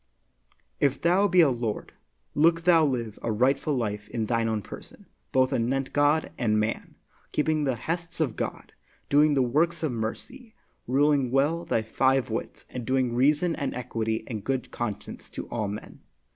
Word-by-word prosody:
If 140 -1 +2
thou 185 +4 +3
be 180 -1 +5
a 150 -5 +5
lord, 115 -3 -3 0.4
look 165 +2 +3
thou 165 -2 +5
live 120 -7 -1
a 115 - -1
rightful 135 +6 +1
life 105 -4 -3
in 115 -2 -2
thine 115 0 0
own 110 -2 -1
person, - - -11 0.3
both 130 +1 +3
anent 130 +3 -1
God 145 +2 +2
and 110 -3 +2
man, 105 +1 -3 0.4
keeping 155 0 +1
the 135 -2 +1
hests 165 +8 -4
of 145 -8 0
God, - - -5 0.4
doing 145 +1 +5
the 135 - +3
works 160 +7 +1
of 155 - +1
mercy, 220 - -6 0.3
ruling 140 0 +3
well 145 +6 +1
thy 115 -9 0
five 130 +3 +1
wits, 110 - -5
and 125 - -6
doing 130 0 +1
reason 150 +7 +3
and 140 - -3
equity 115 -3 -2
and 110 -5 -5
good 135 -2 -2
conscience 105 -4 -5
to - - -7
all 110 -3 -2
men. 105 +2 -8
130 Hz, 170 wpm, -27 LUFS, 115-155 Hz, 0.4 s, be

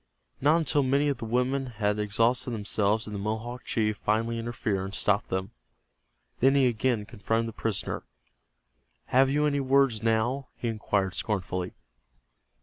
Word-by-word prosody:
Not 150 +4 +5
until 155 -3 +2
many 140 +2 +2
of 140 - -1
the - - -4
women 125 +4 0
had 105 -1 +1
exhausted 115 +5 +1
themselves 105 0 0
did 105 - -7
the 100 - -3
Mohawk 110 +4 -4
chief 105 -2 0
finally 115 +3 0
interfere, 115 -4 -2
and 95 +1 -5
stop 105 0 +1
them. 95 +1 -3 0.9
Then 135 +2 +4
he 135 -2 +5
again 120 -2 +1
confronted 115 +1 -1
the - - -9
prisoner. 110 -4 -2 1.1
"Have 135 +1 +5
you 150 +2 +2
any 145 -1 +1
words 135 -4 +3
now?" 115 +4 +1
he 120 - -3
inquired 105 -4 0
scornfully. 90 -3 -3
115 Hz, 150 wpm, -28 LUFS, 105-130 Hz, 1.1 s, Not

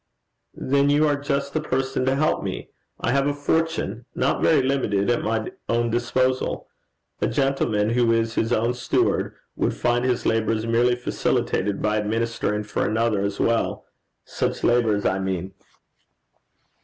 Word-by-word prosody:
'Then 140 +1 +1
you 150 +2 +4
are 145 - +2
just 140 -1 -2
the 155 - 0
person 135 -2 -1
to 130 - +3
help 155 +3 +1
me! - - -5 0.3
I - - 0
have 140 +2 +2
a 145 - 0
fortune, 145 - -1
not - - 0
very 155 -5 +4
limited, 120 -6 +1
at 120 - +1
my 110 0 -2 0.2
own 115 0 +1
disposal: 130 +2 0 0.5
a - - +2
gentleman 115 -6 +1
who 120 -1 +3
is 115 0 +1
his 115 0 0
own 115 +1 +2
steward, 125 -1 0 0.2
would - - 0
find 120 0 +1
his 125 -1 0
labours 110 0 +1
merely 120 +2 +3
facilitated 105 -4 -1
by 105 0 +1
administering 105 0 -1
for 105 - -2
another 110 -2 +1
as 100 0 -2
well 115 0 0 0.4
such - - -2
labours, 115 -4 +2
I 95 - +1
mean.' 95 -1 -3
120 Hz, 155 wpm, -23 LUFS, 110-135 Hz, 0.5 s, you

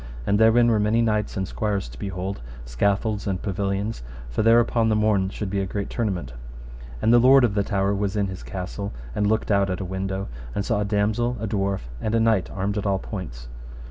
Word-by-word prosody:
And 100 +8 +2
therein 115 +2 +5
were 110 -2 +3
many 105 +2 +2
knights 105 -3 0
and 95 -1 -1
squires 105 - -2
to - - -12
behold, 95 -2 -4 0.2
scaffolds 100 - 0
and 95 -2 -1
pavilions; 100 - -2 0.3
for - - 0
there 115 +2 +6
upon 115 -1 +2
the 110 - +2
morn 105 -3 +2
should 100 -1 -5
be 100 - 0
a 95 - -1
great 100 +1 -4
tournament: 100 - -2 0.7
and 115 - +5
the 120 - +7
lord 130 +2 +7
of 115 -4 +3
the 100 - +2
tower 100 0 0
was 100 0 -1
in 100 -1 +1
his 95 -1 -6
castle 95 +2 -5 0.2
and 105 +6 +1
looked 110 +1 0
out 100 -1 +3
at 90 - -2
a 95 - -4
window, 95 +1 -3 0.3
and 100 - -1
saw 105 - 0
a - - 0
damosel, 110 +4 0
a 110 - -3
dwarf, 100 -2 -1 0.2
and 110 +1 0
a - - +3
knight 110 -5 +2
armed 100 +2 -2
at 100 - -5
all 100 -1 +2
points. 75 - -7
100 Hz, 220 wpm, -24 LUFS, 95-110 Hz, 0.7 s, the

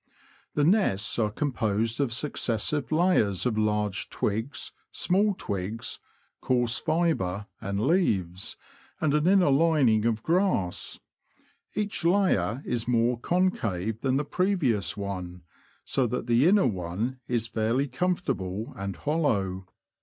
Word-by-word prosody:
The 150 - +2
nests 145 - +2
are 110 -2 +2
composed 115 -2 -1
of 135 -4 0
successive 130 +2 -1
layers 155 - +2
of 120 -3 +1
large 105 -2 0
twigs, 110 +8 -3 0.2
small 200 +3 +1
twigs, 110 +6 -4 0.4
coarse 120 -3 +1
fibre 150 - 0 0.2
and 100 -2 -2
leaves, 100 - 0 0.4
and 155 -5 +1
an 150 +2 +2
inner 185 -6 +5
lining 135 -8 +3
of 115 -1 0
grass; 170 - 0 0.8
each 210 -4 -2
layer 160 - +2
is 120 -2 -2
more 120 0 +2
concave 115 - 0
than 135 -1 +1
the 145 - -1
previous 140 - 0
one, 90 -3 -5 0.4
so 130 -2 +1
that 125 0 -3
the 120 +5 +4
inner 200 +2 +5
one 105 +5 -2
is 120 -2 0
fairly 115 +5 0
comfortable 125 - -2
and 100 -1 -4
hollow. 100 - -1
120 Hz, 125 wpm, -27 LUFS, 100-155 Hz, 0.8 s, inner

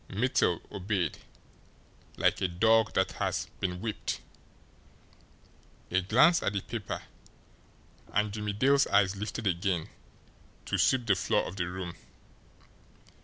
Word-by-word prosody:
Mittel 100 -5 +1
obeyed 95 -4 -2 1.0
like - - +2
a 95 - +2
dog 110 +5 +3
that 95 0 +2
has - - 0
been 90 -1 -2
whipped. 110 -2 -3 1.7
A 90 +1 +3
glance 130 - +5
at 100 - -1
the 100 - -1
paper, 110 -4 -5 1.1
and 105 +1 +1
Jimmie 105 -1 -3
Dale's 135 +6 +3
eyes 100 -1 +3
lifted 105 +2 -5
again 90 -2 0 0.8
to - - -1
sweep 130 -2 +3
the 105 - +4
floor 90 - +1
of 95 - -8
the 90 -2 -1
room. 90 -1 -5
100 Hz, 120 wpm, -29 LUFS, 90-110 Hz, 1.7 s, glance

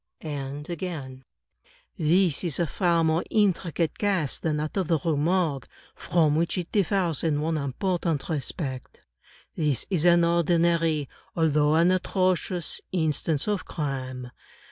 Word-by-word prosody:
And 145 -1 -5
again: 150 -7 -6 0.7
"This 175 -1 +2
is 165 -7 -1
a 170 - +1
far 170 +1 +1
more 160 +1 +2
intricate 180 -6 0
case 190 -9 0
than 155 -2 -1
that 150 +1 -3
of 190 -4 0
the 165 - +3
Rue 160 +1 -1
Morgue; 155 -3 0 0.3
from 155 -4 +1
which 170 +4 0
it 175 -2 -4
differs 185 -5 +1
in 155 -3 +1
one 160 +2 -1
important 155 +2 -1
respect. 140 -4 -4 0.5
This 150 -5 0
is 170 -5 +1
an 170 -1 +6
ordinary, 170 -2 +2 0.3
although 150 -2 +3
an 170 +3 +4
atrocious 185 -2 0
instance 160 -2 0
of 205 -2 -1
crime. 130 -4 -4
165 Hz, 135 wpm, -26 LUFS, 150-175 Hz, 0.7 s, an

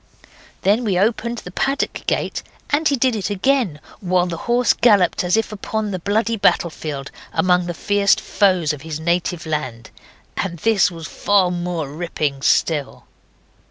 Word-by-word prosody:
Then 210 +5 +3
we 200 -5 0
opened 235 +4 0
the 180 - -8
paddock 275 +8 -2
gate, - - -1 0.3
and 300 +2 +2
he 285 - +2
did 255 -2 +1
it 210 -2 -2
again, 205 - +1 0.2
while 180 -3 +1
the 175 -2 -4
horse 245 +1 +4
galloped 205 -8 +3
as 180 +4 +2
if 225 -1 -1
upon 215 0 -3
the 185 - -3
bloody 220 +5 0
battlefield 155 -7 0 0.2
among 180 -1 +2
the 175 - -4
fierce 205 +1 +3
foes 185 -6 +1
of 145 - -8
his 155 0 -5
native 170 +1 -1
land, 130 -8 -4 0.5
and 175 -3 -2
this 210 0 +3
was 165 -2 -9
far 190 +1 +2
more 175 -3 -3
ripping 150 -2 -3
still. 145 -1 0
180 Hz, 160 wpm, -20 LUFS, 165-215 Hz, 0.5 s, horse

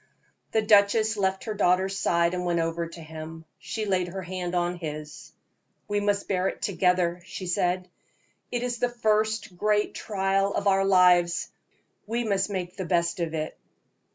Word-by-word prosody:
The 220 - +2
duchess 215 +1 +4
left 190 -2 0
her 220 - -3
daughter's 190 -1 +2
side 170 -2 +2
and 180 0 -2
went 175 -1 +1
over 165 0 -1
to 165 0 -11
him. 160 +1 -9
She 220 -1 -4
laid 185 -3 +1
her 190 +2 -6
hand 180 0 -4
on 175 0 0
his. 150 -2 -7 0.6
"We 205 -1 0
must 205 0 0
bear 185 -1 +1
it - - -4
together," 180 -2 +1
she 185 +1 -7
said. 180 +1 0 0.6
"It 245 0 -1
is 245 -1 -2
the 245 - +1
first 215 -3 0
great 210 +2 +1
trial 195 -1 0
of - - -1
our 195 -1 +3
lives 180 -2 +4 0.6
we 235 +2 -1
must 200 -2 0
make 185 -2 -4
the 190 - -3
best 170 +2 +1
of 165 -1 -2
it." 155 0 -3
185 Hz, 170 wpm, -26 LUFS, 175-205 Hz, 0.6 s, duchess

